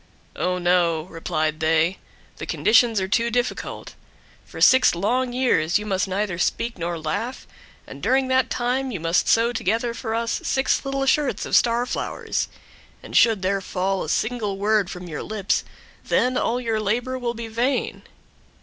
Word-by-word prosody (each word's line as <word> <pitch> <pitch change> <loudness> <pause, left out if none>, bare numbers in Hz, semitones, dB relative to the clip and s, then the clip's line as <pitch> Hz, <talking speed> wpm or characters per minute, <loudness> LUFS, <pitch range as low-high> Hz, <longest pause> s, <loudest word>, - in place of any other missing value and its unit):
"Oh, 180 0 -1
no," 175 -3 +2
replied 155 -2 -2
they, 160 +3 +2 0.4
"the - - -7
conditions 225 -1 +3
are 190 - -2
too 230 +4 +1
difficult. 245 +1 -3 0.5
For - - -10
six 260 -7 +6
long 245 +8 0
years 225 -10 +2
you 210 - -5
must 190 -2 0
neither 190 -2 -2
speak 235 +6 -1
nor 170 0 -3
laugh, 205 +11 -4 0.4
and - - -11
during 265 0 +2
that 260 0 +2
time 255 +2 -1
you 205 -8 -4
must 165 +2 +1
sew 230 +1 +3
together 230 +3 -1
for 225 -1 -4
us 230 0 -1
six 265 0 +1
little 275 0 -2
shirts 285 +1 +1
of - - 0
star 235 +1 +3
flowers, - - -3 0.6
and - - -9
should 225 -5 +4
there 195 +1 0
fall 190 +1 -2
a - - -6
single 220 -1 -1
word 205 -1 +1
from 180 0 -8
your 155 -3 -5
lips, 210 -2 -1 0.4
then 255 +1 +1
all 245 0 0
your 225 -3 -1
labor 245 +5 -1
will 240 -1 -2
be 230 0 -6
vain." 240 +5 -1
220 Hz, 165 wpm, -23 LUFS, 180-245 Hz, 0.6 s, six